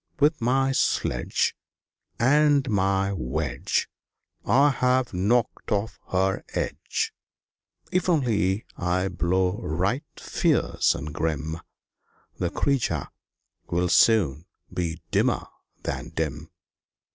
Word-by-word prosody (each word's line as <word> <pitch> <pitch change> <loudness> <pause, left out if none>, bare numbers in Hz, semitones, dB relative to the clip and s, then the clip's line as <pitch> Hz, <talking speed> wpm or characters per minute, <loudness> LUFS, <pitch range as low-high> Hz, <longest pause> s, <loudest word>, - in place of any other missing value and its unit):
"With 150 0 +3
my 135 +3 +2
sledge - - 0 0.6
And 145 +2 +4
my 95 0 +1
wedge 75 -4 -1 0.6
I 140 +3 +4
have 125 -2 +1
knocked 110 +8 0
off 105 +1 -1
her 95 +1 +1
edge! - - -2 0.8
If 185 0 +1
only 110 - +1
I 90 +1 0
blow 90 +2 0
right 95 - -1
fierce - - +1
and 75 +1 -6
grim, 80 +1 -2 0.8
The - - 0
creature 140 -3 0 0.6
will 90 +1 +1
soon 85 - +4 0.3
be 85 -2 -2
dimmer - - +2 0.4
than - - -4
dim." - - -3
95 Hz, 100 wpm, -25 LUFS, 90-130 Hz, 0.8 s, And